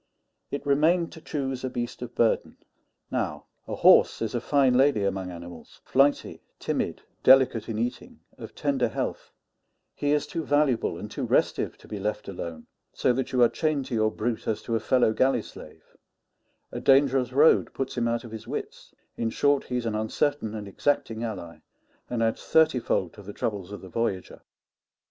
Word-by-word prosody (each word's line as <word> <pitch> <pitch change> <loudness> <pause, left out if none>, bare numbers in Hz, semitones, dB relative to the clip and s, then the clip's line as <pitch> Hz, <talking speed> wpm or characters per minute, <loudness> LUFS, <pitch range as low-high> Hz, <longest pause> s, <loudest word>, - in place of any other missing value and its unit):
It 140 - -5
remained 160 +5 +2
to 160 - -12
choose 135 -5 -3
a 130 - -1
beast 120 -1 -5
of 125 -1 -7
burden. 115 - +1 0.5
Now, - - -2 0.2
a - - -3
horse - - +5
is 110 -2 -3
a 120 - -1
fine 135 -1 +3
lady 130 -4 +3
among 95 -1 -2
animals 85 -1 -11
flighty, 140 +2 +2 0.2
timid, - - -3 0.2
delicate 130 -4 +5
in 110 - -3
eating, 120 +2 -4 0.2
of - - -10
tender - - 0
health; - - -4 0.6
he 145 - -1
is 150 -1 +2
too 165 - -4
valuable 145 -5 +1
and - - -8
too - - -4
restive - - +1
to - - -17
be 105 - -6
left 105 +1 -3
alone, 85 -4 -6 0.3
so 125 - +2
that 130 +1 -2
you 125 -2 +4
are - - +7
chained 150 0 -1
to 130 - -7
your 110 -1 +2
brute 115 +1 -3
as 110 -1 -1
to 115 - -2
a - - +1
fellow 120 0 +2
galley 130 +4 +2
slave; - - -14 0.8
a - - -4
dangerous 135 -2 +3
road 145 +5 +4
puts 135 - -4
him 120 -2 0
out 115 0 -1
of 115 - -10
his 110 -1 -8
wits; - - -7 0.2
in 115 - 0
short, 145 +4 +2
he's 125 -1 -3
an 115 - -1
uncertain 110 +2 -1
and 105 -2 -6
exacting 115 +1 -1
ally, 95 -7 -6 0.5
and 120 -2 -1
adds 115 0 -1
thirty 160 -5 +4
fold 95 -6 -1
to 105 - -12
the 100 +1 -9
troubles 100 -4 -3
of 105 - -7
the 95 - -10
voyager. 95 -2 -3
120 Hz, 185 wpm, -26 LUFS, 110-135 Hz, 0.8 s, are